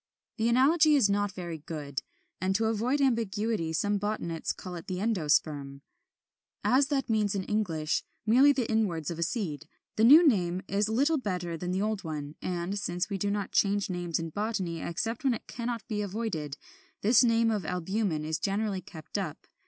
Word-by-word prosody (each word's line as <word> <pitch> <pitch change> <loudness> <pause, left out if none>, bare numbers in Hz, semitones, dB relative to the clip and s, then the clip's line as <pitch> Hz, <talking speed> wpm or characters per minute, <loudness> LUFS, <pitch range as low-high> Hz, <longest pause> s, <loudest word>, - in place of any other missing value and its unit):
The 225 0 +2
analogy 300 +5 +5
is 225 -8 +4
not 205 0 +1
very 175 -4 -6
good; 145 -4 -5 0.4
and 190 +1 +1
to 225 +2 +2
avoid 230 +6 +1
ambiguity 220 -7 0
some 205 +5 0
botanists 195 -6 -2
call 185 - -8
it 170 -2 -8
the 185 -1 -3
ENDOSPERM. 150 -8 0 0.8
As 265 +2 +4
that 275 -2 -1
means 215 -3 +1
in 195 - -1
English 175 -7 -1 0.2
merely 255 +6 +6
the 255 -5 0
inwards 180 -9 0
of 170 - -6
a - - -2
seed, 165 - -2 0.3
the 220 - +3
new 305 +8 +9
name 185 -7 +1
is 205 +2 0
little 280 +7 +2
better 180 -7 -3
than 180 +2 -4
the 190 +2 0
old 215 -2 -2
one; 150 -3 -5
and, 180 +2 -2
since 180 0 -2
we 195 - -2
do 205 - 0
not 205 -1 -2
change 200 -1 +2
names 175 -2 -2
in 165 -1 -4
botany 190 -5 -2
except 215 - -3
when 260 -3 +3
it - - -9
cannot 235 -1 -4
be 210 -2 -2
avoided, 190 -9 -3 0.4
this 230 +4 +5
name 230 -1 +3
of 210 -4 -1
albumen 180 -1 -1
is 155 0 -2
generally 200 -1 -1
kept 160 -3 -7
up. - - -5
200 Hz, 185 wpm, -29 LUFS, 170-225 Hz, 0.8 s, new